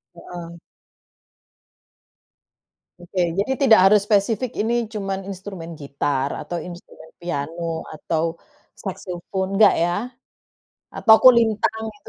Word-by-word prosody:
Heeh. 170 -1 -9 2.4
Oke, 175 +2 -6 0.2
jadi 205 +6 0
tidak 260 -6 +6
harus 210 -1 +6
spesifik 220 +3 +1
ini 220 +3 0 0.2
cuman 195 -2 -3
instrumen 185 -4 -8
gitar 140 -2 -2
atau 175 - -5
instrumen 170 -2 -12
piano 165 0 -4
atau, 155 +1 -2 0.6
saxophone, 190 0 -4
nggak 210 -2 +7
ya? 175 - +1 1.1
Atau 220 -1 +7
kulintang 220 -3 +4
gitu? - - -17
185 Hz, 100 wpm, -22 LUFS, 170-210 Hz, 2.4 s, nggak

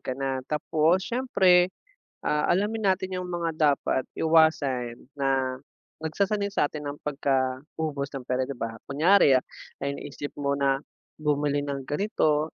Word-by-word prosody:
ka 130 - -4
na 135 -1 -2
tapos 160 +4 +2
siyempre, 190 -8 +4 0.5
ah, 150 0 +1
alamin 205 +3 +1
natin 185 0 -5
yung 180 - -4
mga 175 -2 -2 0.2
dapat 130 - -2
iwasan 145 -7 +2 0.2
na 135 -1 0 0.4
nagsasanay 200 +6 0
sa'tin 150 0 -1
ng 145 +1 -5
pagkaubos 140 +1 -1
ng 135 - -4
pera, 125 +1 -1
'di 140 - -5
ba? 115 -1 -5
Kunyari 155 +1 +5 0.5
naisip 140 +1 -4
mo 140 0 0
na 135 -1 +2 0.4
bumili 145 -1 +1
ng 140 -1 -3
ganito, 155 -1 0
150 Hz, 130 wpm, -26 LUFS, 135-175 Hz, 0.5 s, Kunyari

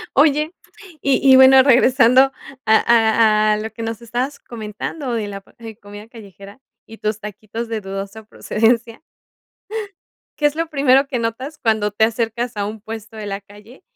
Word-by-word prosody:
Oye, 300 +3 +3 0.5
y 275 0 +3
y - - +9
bueno, 265 0 +8
regresando 255 0 +5 0.3
a 220 - +1
a 220 -2 +3
a - - 0
lo 220 +1 -5
que 230 - -8
nos 225 0 -5
estabas 245 +5 -4
comentando 235 +4 -6
de 215 -3 -2
la 195 -1 -7
p 220 +2 -13
comida 205 0 -12
callejera 200 -1 -14 0.3
y 225 - -12
tus 215 0 -2
taquitos 215 +2 -7
de 220 -2 -3
dudosa 195 +3 -7
procedencia, 230 +3 -1 1.4
¿qué 295 - +2
es 295 - 0
lo 330 0 -2
primero 275 -2 +3
que 250 - -2
notas 255 +6 -4
cuando 215 -2 0
te 220 +1 +2
acercas 230 +1 -2
a 200 0 -2
un 215 0 -7
puesto 220 +1 -9
de 210 -1 -7
la 200 0 -4
calle 205 +5 -17
225 Hz, 170 wpm, -19 LUFS, 215-255 Hz, 1.4 s, y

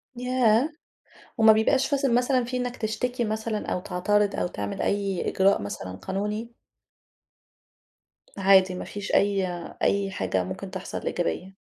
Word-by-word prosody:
ياه! 250 +1 +2 0.7
وما 220 0 +8
بيبقاش 260 +5 +3
فثل 275 -4 +1
مثلًا 250 0 +2
في 250 +1 -4
إنّك 245 0 -3
تشتكي 235 +3 -2
مثلًا، 215 0 -3
أو 180 - -1
تعترض، 205 +3 +1
أو - - 0
تعمل 100 -10 -4
أي 200 -3 -1
إجراء 195 - +3
مثلًا 95 -2 -6
قانوني؟ 210 - -4 1.9
عادي 190 -1 +5
ما - - -5
فيش 205 -1 -6
أي 200 -2 +2 0.3
أي 200 -1 +1
حاجة 95 - -1
ممكن 95 - -6
تحصل 185 -1 -5
إيجابية. 180 +2 -2
205 Hz, 135 wpm, -26 LUFS, 190-240 Hz, 1.9 s, وما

